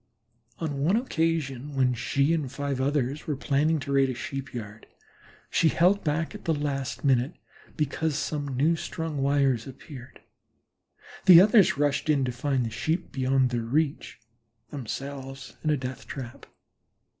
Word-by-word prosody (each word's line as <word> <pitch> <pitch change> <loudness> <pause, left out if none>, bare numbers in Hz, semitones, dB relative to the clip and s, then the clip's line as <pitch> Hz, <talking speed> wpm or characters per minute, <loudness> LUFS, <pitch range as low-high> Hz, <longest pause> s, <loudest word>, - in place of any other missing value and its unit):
On 145 -4 -3
one 180 +7 +3
occasion, 160 - -1
when 130 -2 +3
she 140 +6 +1
and 150 -6 -2
five 140 -2 -3
others 140 0 -1
were 150 - 0
planning 150 +3 +1
to 140 - -5
raid 135 -1 +3
a 130 - -3
Sheep 135 +1 -5
yard, 110 -2 -8 0.6
she 165 - +4
held 185 +6 +3
back 155 +1 -1
at - - -10
the 165 - +1
last 140 -2 -3
minute 130 +3 +2 0.4
because 150 0 -1
some 145 -4 -3
newstrung 160 +1 -1
wires 135 -3 +1
appeared. 135 -1 -11 1.1
The 175 -2 +10
others 205 -3 +5
rushed 145 +1 0
in 140 -3 +3
to 125 - -1
find 130 0 -1
the 115 - -4
Sheep 160 +9 -2
beyond 130 -1 +1
their 120 -1 -1
reach, 140 +6 -1 0.5
themselves 135 +1 -6
in 155 - 0
a 150 - +3
death 130 0 -6
trap. 125 -4 -8
140 Hz, 150 wpm, -27 LUFS, 130-155 Hz, 1.1 s, The